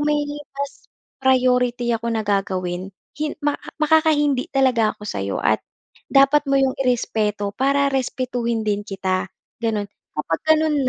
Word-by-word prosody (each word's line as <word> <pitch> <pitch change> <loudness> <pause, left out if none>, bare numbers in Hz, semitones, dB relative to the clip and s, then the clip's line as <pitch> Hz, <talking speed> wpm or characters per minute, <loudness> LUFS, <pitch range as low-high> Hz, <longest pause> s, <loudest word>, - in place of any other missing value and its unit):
may 295 0 +2 0.4
mas 280 0 -6 0.3
priority 250 -2 +2
ako 230 0 -2
na 225 -2 -1
gagawin 185 -2 -1 0.2
hin 300 0 -3
maka 290 -1 -1
makakahindi 305 -3 +3
talaga 255 -5 +2
ako 210 - -11
sa'yo 100 - -3
at - - +3 0.5
dapat 275 +2 +5
mo 275 - +3
'yong 270 -1 +3
i-respeto 210 -5 0
para 275 +4 +2
respetuhin 245 -3 -1
din 205 -1 0
kita, 190 -2 -2 0.3
ganun. 220 -3 0 0.3
Kapag 160 +2 -1 0.2
ganun 300 -4 +1
250 Hz, 130 wpm, -22 LUFS, 210-275 Hz, 0.5 s, dapat